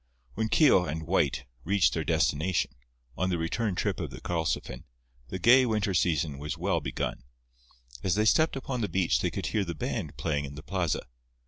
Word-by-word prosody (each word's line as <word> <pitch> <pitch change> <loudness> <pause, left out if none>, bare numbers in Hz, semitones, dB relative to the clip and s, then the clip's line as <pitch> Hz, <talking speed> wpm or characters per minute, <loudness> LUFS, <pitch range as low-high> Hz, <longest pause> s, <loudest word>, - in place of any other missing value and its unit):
When 110 - -1
Keogh 130 - +5
and 80 +2 -4
White 85 -5 +1 0.2
reached 100 +1 +3
their 80 - -1
destination, 80 +2 +1 0.4
on 95 +1 0
the 90 - 0
return 95 +5 -1
trip - - -1
of - - -3
the - - -9
Karlsefin, 80 -7 -2 0.4
the 95 - -4
gay 120 +8 +6
winter 105 -5 0
season 80 -5 +1
was 75 +3 -4
well 85 -1 0
begun. 65 -2 -3 0.8
As 95 - +1
they 105 +1 +2
stepped 155 +9 +4
upon 130 -2 -3
the 105 - -1
beach 95 -3 +1
they - - +1
could - - -4
hear 105 - 0
the 85 -3 -5
band - - -4
playing 75 -3 -1
in 70 +1 -8
the 75 - -9
plaza. 90 -6 -1
85 Hz, 190 wpm, -28 LUFS, 80-100 Hz, 0.8 s, gay